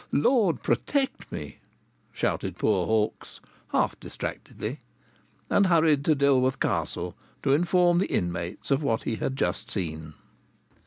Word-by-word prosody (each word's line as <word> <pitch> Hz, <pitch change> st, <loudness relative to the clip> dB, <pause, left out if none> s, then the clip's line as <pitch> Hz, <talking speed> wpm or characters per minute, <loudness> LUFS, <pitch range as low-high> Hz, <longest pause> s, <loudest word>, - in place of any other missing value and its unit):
"Lord, 175 Hz, -, +2 dB
protect 275 Hz, -2 st, 0 dB
me!" 75 Hz, -1 st, -6 dB, 0.5 s
shouted -, -, -2 dB
poor 95 Hz, -5 st, +1 dB
Hawkes, 110 Hz, -1 st, -1 dB, 0.3 s
half -, -, +1 dB
distractedly, -, -, -6 dB, 0.7 s
and 200 Hz, -, +3 dB
hurried 160 Hz, -5 st, +4 dB
to 155 Hz, -, +4 dB
Dilworth 135 Hz, -2 st, +3 dB
Castle -, -, -1 dB, 0.3 s
to 135 Hz, -, +3 dB
inform 175 Hz, +2 st, +3 dB
the 195 Hz, -, -1 dB
inmates 85 Hz, +6 st, -2 dB
of 135 Hz, +2 st, +3 dB
what 115 Hz, -7 st, 0 dB
he 110 Hz, -, -2 dB
had 135 Hz, -, -2 dB
just 100 Hz, 0 st, -2 dB
seen. 80 Hz, -7 st, -4 dB
135 Hz, 125 wpm, -27 LUFS, -, 0.7 s, hurried